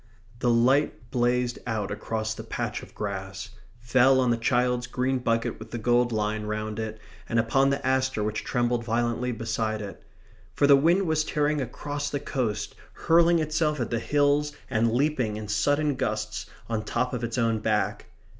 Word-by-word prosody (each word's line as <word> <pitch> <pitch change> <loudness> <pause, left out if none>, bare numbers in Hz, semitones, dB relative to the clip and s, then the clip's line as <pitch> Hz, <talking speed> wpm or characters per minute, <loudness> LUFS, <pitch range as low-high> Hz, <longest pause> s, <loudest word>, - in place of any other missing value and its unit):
The 125 - +1
light 120 +1 +2
blazed 120 0 +1
out 110 -4 -2
across 110 +1 -3
the - - -8
patch - - -3
of - - -14
grass; 95 0 -5 0.3
fell 130 +2 +4
on 125 -2 +3
the - - +3
child's 125 +1 +1
green 130 +1 0
bucket 115 -2 -1
with - - -10
the 120 - -4
gold 120 +1 +2
line 105 -1 -1
round 105 0 -3
it, 110 0 -4 0.3
and 115 - 0
upon 135 +4 +3
the 140 -1 -1
aster 130 -3 +1
which 105 0 -2
trembled 120 -1 0
violently 120 +1 0
beside 110 -1 -2
it. 100 -2 -8 0.5
For - - +3
the 140 0 +8
wind 170 +7 +3
was 160 -2 +1
tearing 150 -1 0
across 145 +3 -4
the 145 - -2
coast, 125 -6 -2 0.2
hurling 170 +1 +4
itself 155 -1 0
at 120 - -2
the 115 - 0
hills, 145 +3 +2 0.2
and 115 -1 +2
leaping, 125 -4 0
in 110 -1 -6
sudden 145 +9 +1
gusts, 110 -3 -3 0.2
on 110 -2 -2
top 125 +4 -1
of 125 -1 -3
its 115 +1 -3
own 115 -2 +1
back. 105 -1 -1
120 Hz, 175 wpm, -26 LUFS, 110-135 Hz, 0.5 s, the